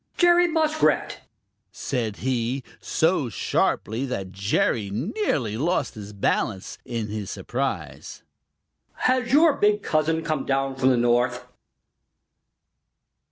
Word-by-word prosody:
"Jerry 350 0 +5
Muskrat," 315 -1 +1 0.5
said 115 -6 -3
he, 125 +1 -1 0.2
so 160 -6 +1
sharply 110 +3 -1
that 95 -7 -4
Jerry 100 +2 0
nearly 120 - -1
lost 155 0 0
his 105 -1 -9
balance 100 -1 -2
in 115 -3 -4
his 105 -2 -5
surprise, - - -4 0.7
"has 255 -1 0
your 305 +2 +6
big 210 -2 +2
cousin 160 +1 +1
come 155 -3 -1
down 135 0 -1
from 130 0 +2
the 125 - +3
North?" 120 +1 +1
130 Hz, 110 wpm, -24 LUFS, 110-185 Hz, 0.7 s, your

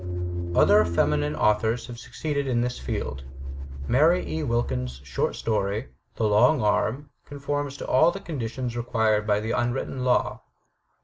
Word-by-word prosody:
Other 105 +1 +6
feminine 75 -3 +1
authors 105 +6 +1
have 120 -1 -9
succeeded 140 +3 -3
in 120 -2 +1
this 125 +1 -2
field. 65 +1 -4 0.6
Mary 160 +8 +3
E. 160 - -3
Wilkins* 65 - -2
short 65 -2 -2
story, 105 +2 -1 0.3
"The - - -2
Long 120 +8 +4
Arm/' 110 +6 0 0.2
conforms 145 0 -3
to - - -6
all 160 +6 +5
the 195 - -4
conditions 125 - -4
required 110 -3 +1
by 105 -1 +3
the 110 +2 -3
imwritten 120 +2 -1
law. 125 -1 +1
120 Hz, 140 wpm, -25 LUFS, 105-135 Hz, 0.6 s, Other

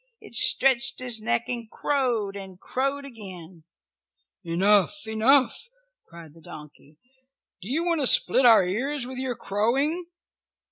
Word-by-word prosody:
It - - -16
stretched 265 +2 +4
its 245 -3 0
neck 120 - -2
and 235 -2 -7
crowed, 240 -9 -3
and 190 -2 -10
crowed 275 +5 -4
again. 185 - -12 0.8
"Enough! 190 - +1
Enough!" 255 - +1 0.4
cried 170 -3 -15
the 165 - -19
donkey. 150 -1 -14 0.6
"Do 190 - -9
you 320 +5 -1
want 335 -3 -1
to 265 - +3
split 260 - +5
our 225 -5 +5
ears 255 +8 -3
with 255 0 -8
your 260 -2 -4
crowing?" 270 - -2
230 Hz, 135 wpm, -24 LUFS, 190-270 Hz, 0.8 s, split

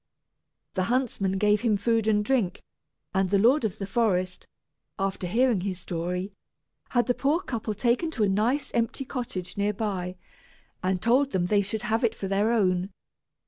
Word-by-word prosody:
The 185 -1 0
huntsman 230 -5 0
gave 210 +1 +3
him 225 -4 +2
food 225 +1 +1
and 210 -1 +2
drink; 235 -7 0 0.5
and 190 -1 +1
the 200 - +3
lord 245 +8 +4
of 215 -4 -1
the 195 - -4
forest, 185 -3 0 0.5
after 195 -2 -2
hearing 235 +1 +2
his 185 -1 -3
story, 180 +3 -3 0.6
had 240 -1 +2
the 245 - +2
poor 285 +6 +1
couple 230 - -4
taken 240 - +1
to 220 - +2
a - - +4
nice 225 +9 +1
empty 235 +3 -1
cottage 200 -9 -5
near 205 +1 +1
by, 190 -4 -3 0.7
and 185 0 0
told 260 +4 +3
them 180 -2 +1
they 205 +2 +3
should 205 +2 -4
have 225 +3 0
it 230 -1 +2
for 195 - -4
their 200 +3 +2
own. 185 -4 +2
210 Hz, 175 wpm, -27 LUFS, 190-235 Hz, 0.7 s, lord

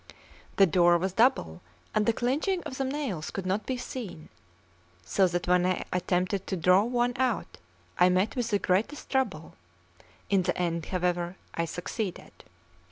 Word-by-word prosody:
The 195 - +6
door 175 0 +4
was 185 +2 -2
double, 205 - +2 0.3
and 210 -1 +1
the - - +6
clinching 295 - 0
of 260 - -6
the - - +1
nails 260 - -3
could 195 - -5
not 195 +3 -1
be 260 - -1
seen; 235 -10 -7 0.8
so 190 - +3
that 175 0 -2
when 180 0 +4
I 185 0 0
attempted 180 +2 0
to 190 - -2
draw 180 +3 +5
one 240 +2 0
out, 255 -4 -1 0.4
I 180 - +6
met 185 +4 +1
with 245 -3 -1
the 205 - +2
greatest 200 +10 -1
trouble; 210 - -1 0.7
in 195 -2 +3
the 180 0 -1
end, 170 -2 -1
however, 180 -1 -1 0.2
I 170 - -1
succeeded. 180 +4 -5
190 Hz, 165 wpm, -28 LUFS, 175-240 Hz, 0.8 s, The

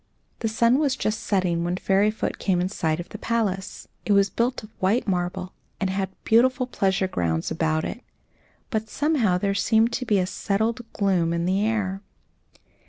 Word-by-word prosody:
The 225 - -1
sun 235 +4 +3
was 285 -3 +1
just 215 -6 -1
setting 180 -4 0
when 175 +1 -1
Fairyfoot 205 +3 +1
came 185 -3 +1
in 180 +1 0
sight 160 -5 -1
of 175 +1 -7
the 215 - -8
palace. 205 -5 -2 0.2
It 210 - +2
was 200 0 +4
built 245 +1 -1
of 215 - -12
white 200 +6 +1
marble, 180 0 -2 0.3
and 190 -1 0
had 190 0 -1
beautiful 255 +3 +3
pleasure 195 -5 0
grounds 80 - -1
about 160 -1 0
it, 240 - -5 0.7
but 220 -2 -2
somehow 275 - +1
there 195 +2 0
seemed 225 +3 +2
to 250 - -2
be 210 - +3
a 185 - +2
settled 220 +5 -1
gloom 185 -5 +1
in 170 0 -1
the 190 +3 +1
air. 200 -3 -1
200 Hz, 175 wpm, -24 LUFS, 185-225 Hz, 0.7 s, was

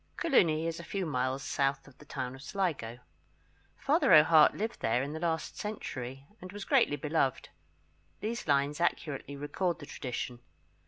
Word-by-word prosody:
[Coloony 165 - +3
is 165 0 -3
a - - -7
few 190 +3 -3
miles 130 -2 -1
south 135 +1 -1
of 140 - -16
the 150 - -14
town 130 -3 -4
of 135 - -11
Sligo. 145 - -2 0.8
Father - - +2
O'Hart 155 0 +7
lived 220 +3 -3
there 120 +3 +1
in 145 +2 -4
the 160 - -4
last 160 -1 -2
century, 135 - -5 0.2
and 185 0 -8
was 205 0 -7
greatly 145 - +3
beloved. 145 -3 -1 0.7
These 230 0 -4
lines 145 +2 +1
accurately 145 -4 -1
record 165 +5 -2
the 145 - -10
tradition. 125 -3 -5
150 Hz, 160 wpm, -31 LUFS, 135-170 Hz, 0.8 s, O'Hart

